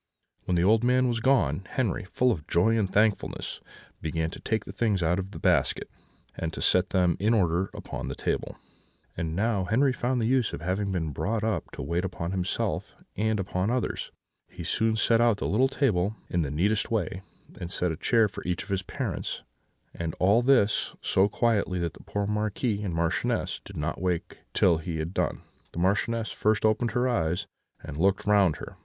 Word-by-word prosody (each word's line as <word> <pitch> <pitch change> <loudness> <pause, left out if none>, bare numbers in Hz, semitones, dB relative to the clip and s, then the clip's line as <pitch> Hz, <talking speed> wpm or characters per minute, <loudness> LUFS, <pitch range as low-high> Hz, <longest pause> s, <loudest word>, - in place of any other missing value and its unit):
"When 90 - +1
the 85 - +2
old 110 +4 +4
man 125 +1 +3
was 120 -1 0
gone, 115 - +2
Henri, 115 -7 0
full 125 +6 +2
of 80 -8 -4
joy 110 +7 +3
and 105 -4 0
thankfulness, 105 0 0 0.4
began 80 +1 -2
to - - -8
take 110 -1 -1
the - - -7
things 100 -3 0
out 85 +3 +2
of 95 0 -4
the 105 - -9
basket, - - +1 0.4
and 80 -1 -3
to - - -6
set 90 0 +3
them 90 -3 +2
in 110 +4 +3
order 90 -2 +1
upon - - -6
the - - -4
table; - - -2 0.6
and 80 -1 -3
now 100 -1 +1
Henri 130 +7 +3
found 125 +1 0
the 115 - 0
use 125 -1 +2
of - - -5
having 95 +3 -1
been 80 -5 -1
brought 105 +9 -1
up 110 -1 -1
to - - -5
wait 85 +5 -1
upon 85 -2 -3
himself 95 -1 -2 0.2
and 110 +1 0
upon 95 +1 -1
others; 125 0 -2 0.4
he 90 - -8
soon 110 +5 +1
set 115 +1 +3
out 120 -3 +4
the - - -3
little 125 +7 +3
table 110 -8 +1
in 85 - +1
the 75 - -1
neatest 100 +9 +1
way, 95 -5 -1 0.4
and 85 - -5
set 90 -3 0
a - - -3
chair 115 +6 +3
for - - -9
each 90 +1 -2
of 100 - -15
his 95 -1 0
parents; 95 - -4 0.5
and 85 -1 -4
all 100 +6 +4
this 120 -5 +3
so 95 +2 +3
quietly 105 -5 +1
that 85 -3 -2
the - - -14
poor 100 0 -3
Marquis 105 +1 -1
and 95 -5 -3
Marchioness 85 0 0
did - - -10
not 75 +4 -3
wake 90 -2 -2 0.2
till 85 -3 +4
he 80 0 -4
had 80 +3 -3
done. - - -1 0.3
The - - -4
Marchioness 110 +5 +1
first 110 0 +1
opened 110 +2 +2
her 125 +1 +2
eyes, 90 -9 0 0.4
and - - -7
looked 95 +3 +2
round 100 -6 +4
her. - - -9
100 Hz, 200 wpm, -27 LUFS, 90-110 Hz, 0.6 s, old